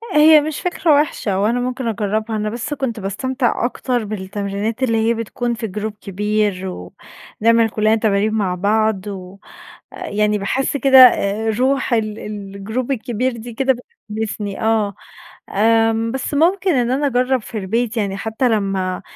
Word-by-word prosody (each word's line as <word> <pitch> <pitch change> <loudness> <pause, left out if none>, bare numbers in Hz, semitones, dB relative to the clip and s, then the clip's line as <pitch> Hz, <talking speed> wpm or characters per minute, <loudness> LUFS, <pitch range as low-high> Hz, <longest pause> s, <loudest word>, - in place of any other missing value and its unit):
هي 305 0 +7
مش 305 0 -4
فكرة 345 -3 +1
وِحشة 260 -9 +1
وأنا 225 +5 +1
ممكن 250 0 -3
أجرّبها، 215 +1 -1
أنا 215 0 -1
بس 240 +6 -4
كنت 240 -6 -3
باستمتع 240 +6 -1
أكتر 245 -1 -1
بالتمرينات 205 +3 -3
اللي 230 -3 +2
هي - - +3
بتكون 235 +1 -3
في 225 -1 -4
جروب 210 +2 -4
كبير 205 -1 -1
و 90 - -8 0.5
نعمل 230 0 +4
كلّنا 215 +1 +2
تمارين 215 -1 +1
مع 195 -4 0
بعض، 210 +1 +1
و 190 -1 -8 0.6
يعني 210 0 0
باحس 265 +8 -1
كده 270 -1 +5
آآ، 220 -3 +5
روح 265 -1 +1
ال 215 -2 -1
الجروب 210 +4 -5
الكبير 250 0 -1
دي 235 +1 -8
كده 265 +3 +2 0.4
بتحمّسني، 210 -2 -4
آه، 220 -3 +1 0.5
آمم، 225 +1 +2
بس 265 +2 -4
ممكن 365 +6 +2
إن 245 -1 +1
أنا 285 +3 +1
أجرّب 255 0 +1
في 220 - -7
البيت 225 +4 -1
يعني، 200 -2 -1
حتى 220 +4 -1
لمّا 195 -4 -1
220 Hz, 155 wpm, -19 LUFS, 205-250 Hz, 0.6 s, هي